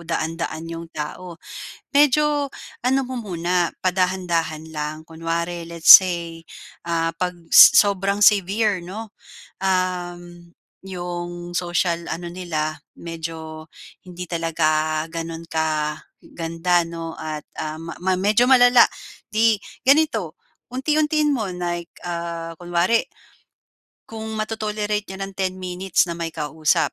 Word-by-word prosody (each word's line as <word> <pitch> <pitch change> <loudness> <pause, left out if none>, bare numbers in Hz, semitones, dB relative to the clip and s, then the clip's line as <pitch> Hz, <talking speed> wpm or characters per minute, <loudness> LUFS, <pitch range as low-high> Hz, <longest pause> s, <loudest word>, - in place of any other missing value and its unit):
daan-daan 165 0 -3
'yong 165 0 -7
tao. 165 +3 -6 0.6
Medyo 290 0 +3 0.3
ano 260 +2 +2
mo 260 - -6
muna, 175 -2 0 0.2
padahan-dahan 180 -4 0
lang. 150 +1 -4
Kunwari, 170 +1 -3
let's 170 -1 +7
say, 170 -3 +4 0.5
ah, 165 0 0
pag 180 +1 -3 0.2
sobrang 200 0 +7
severe 205 -1 +3
'no, 205 +4 -8 0.5
uhm, 175 -2 -2 0.3
'yong 175 -1 -6
social 175 -1 0
ano 175 +1 -5
nila, 160 -3 -3 0.2
medyo 160 -1 -7 0.4
hindi 180 -1 -8
talaga 155 -2 0
ganun 165 0 -6
ka 155 -1 -1 0.2
ganda, 170 +1 0
'no, 165 -1 -7
at 155 -1 -5 0.2
uhm, 155 +2 -5 0.2
ma 190 - +2
medyo 210 +5 +4
malala. 245 -1 +7 0.5
Di 220 0 +4 0.2
ganito, 260 - +2 0.3
unti-untiin 300 +3 +1
mo 220 -8 -1
na, 175 -1 -2
like, 170 - -13 0.2
ah, 170 -1 -4
kunwari 175 +6 +2 1.1
kung 220 -1 -7 0.2
mato-tolerate 210 -1 -2
niya 190 -1 -9
ng 195 0 -5
10 190 -1 -1
minutes 180 0 0
na 170 - -4
may 165 -1 -4
kausap, 155 -1 0
175 Hz, 115 wpm, -22 LUFS, 165-195 Hz, 1.1 s, let's